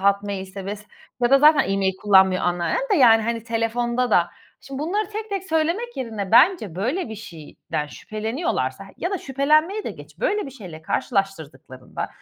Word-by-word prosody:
Hotmail'se 200 0 -1
vs. 210 0 -14 0.4
ya 240 - +3
da 275 - +7
zaten 300 -3 +5
e-mail 195 -1 +1
kullanmıyor 190 -2 +5
anneannem 175 - -1
de - - +4
yani 230 -6 +6
hani, 230 0 -3
telefonda 235 +2 -1
da 175 -4 +4 0.3
şimdi, 270 0 -8
bunları 370 +7 -1
tek 435 +1 -6
tek 395 -2 -3
söylemek 335 +10 -1
yerine 220 -6 -4
bence 235 - +4
böyle 250 - -2
bir 220 - -6
şeyden 160 -6 -6
şüpheleniyorlarsa 220 - -3
ya 355 - -3
da 390 - -2
şüphelenmeyi 305 +10 +1
de - - -3
geç, - - -13
böyle 420 -6 0
bir - - -8
şeyle 180 - -11
karşılaştırdıklarında 155 - -3
230 Hz, 160 wpm, -23 LUFS, 195-310 Hz, 0.4 s, da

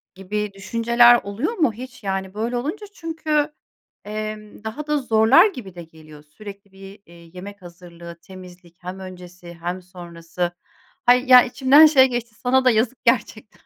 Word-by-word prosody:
gibi 205 +2 -4
düşünceler 235 +4 +3
oluyor 220 - -4
mu 310 - 0
hiç? 255 +2 -11
Yani, 190 -1 -4
böyle 230 +4 -3
olunca 315 - -5
çünkü, 315 -3 -2 0.5
emm, 215 0 -7
daha 270 +8 -7
da 300 0 0
zorlar 245 - +4
gibi 235 - -10
de 175 - -9
geliyor 155 -2 -16
sürekli 200 +5 -13
bir, 195 +1 -14
eee, 170 - -19 0.2
yemek 200 +2 -11
hazırlığı, 170 -1 -13
temizlik 180 -1 -15
hem 180 +2 -7
öncesi 180 -2 -12
hem 175 +2 -4
sonrası. 175 -1 -7 0.5
Hayır 250 +2 +3
ya, 250 -1 +8
içimden 270 +4 +5
şey 285 -4 +5
geçti: 240 -3 -5
Sana 260 +3 0
da 255 - +5
yazık 230 +3 0
gerçekten. 220 -3 -1
210 Hz, 155 wpm, -21 LUFS, 180-250 Hz, 0.5 s, ya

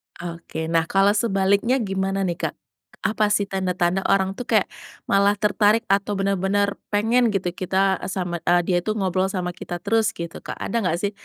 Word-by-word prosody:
Oke. 165 -2 -6
Nah, 165 -1 +2
kalau 195 +1 +4
sebaliknya 200 +3 +2
gimana 195 0 -1
nih 175 -2 -2
Kak? - - -7 0.5
Apa 215 -1 +2
sih 205 -1 +2
tanda-tanda 185 -1 0
orang 195 -1 +2
tuh 245 - -6
kayak 215 -4 +3 0.4
malah 200 +1 +3
tertarik 210 +1 +2
atau 200 +1 0
bener-bener 200 +1 0
pengen 225 +3 +2
gitu 185 -4 -1
kita 190 +1 0
eee, - - -4
sama 175 -3 -3
eee, 175 +1 +3
dia 180 -2 +2
itu 215 - -2
ngobrol 190 -1 0
sama 180 -2 -3
kita 175 -1 -6
terus 225 +1 +2
gitu 170 -1 -6
Kak, - - -7
ada 230 -1 -2
gak 170 -3 0
sih, 205 +1 -1
195 Hz, 180 wpm, -23 LUFS, 180-205 Hz, 0.5 s, kalau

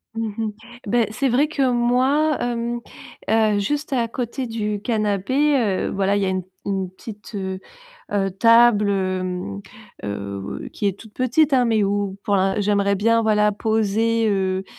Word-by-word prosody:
Mmh 225 0 -2
mh. 225 -1 -1 0.4
Beh, 235 +2 +2
c'est 265 +5 0
vrai 265 +5 +3
que 275 -4 +1
moi, 260 +6 +2
hem, 240 0 -2 0.5
heu, 215 -1 +3
juste 290 +8 -2
à 240 -3 +1
côté 250 +2 -4
du 210 -3 -3
canapé, 225 +6 +1
heu, 205 -7 0
voilà, 195 +1 +1
il - - 0
y - - +1
a - - 0
une 185 -1 -2 0.2
une 190 -2 -2
petite, 210 +2 -11
heu 190 -2 -4 0.5
heu 195 -1 +1
table, 230 +1 +5
hem, 185 - -2 0.4
heu, 100 -1 -5
qui 205 - -2
est 200 -1 -1
toute 220 -2 -14
petite, 265 +5 +2
hein, 250 -2 +4
mais 220 -2 +2
où 200 -1 -1
pour 205 - +1
l'in 195 0 +2
j'aimerais 200 0 +2
bien, 230 +4 +2
voilà, 210 -1 +3
poser, 220 +1 +1
heu, 190 -1 0
215 Hz, 165 wpm, -22 LUFS, 195-240 Hz, 0.5 s, table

